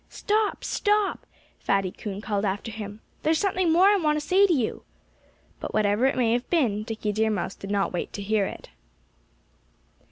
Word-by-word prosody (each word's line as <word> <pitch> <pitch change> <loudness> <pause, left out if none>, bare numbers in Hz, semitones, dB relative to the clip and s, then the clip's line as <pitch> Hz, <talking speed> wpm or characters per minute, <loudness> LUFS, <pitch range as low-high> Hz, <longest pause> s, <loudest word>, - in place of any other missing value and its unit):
"Stop! 425 -1 -1
Stop!" 415 -1 0 0.3
Fatty 195 -2 0
Coon 200 -1 -6
called 205 -1 -2
after 205 +3 -2
him. 210 0 -7 0.2
"There's 315 +1 +2
something 370 -2 +1
more 350 +4 +5
I 410 +1 +6
want 305 -4 +1
to 295 - -7
say 390 +2 +5
to - - 0
you." 255 -9 0 0.8
But - - -5
whatever 210 +4 +3
it 270 - 0
may 230 -3 +2
have 245 +1 -2
been, 240 - +1
Dickie 220 -1 -3
Deer 220 +1 +1
Mouse 200 -2 -2
did 195 - -9
not 200 -2 0
wait 175 - -3
to 200 - -5
hear 205 -1 +1
it. - - -10
225 Hz, 185 wpm, -26 LUFS, 205-335 Hz, 0.8 s, I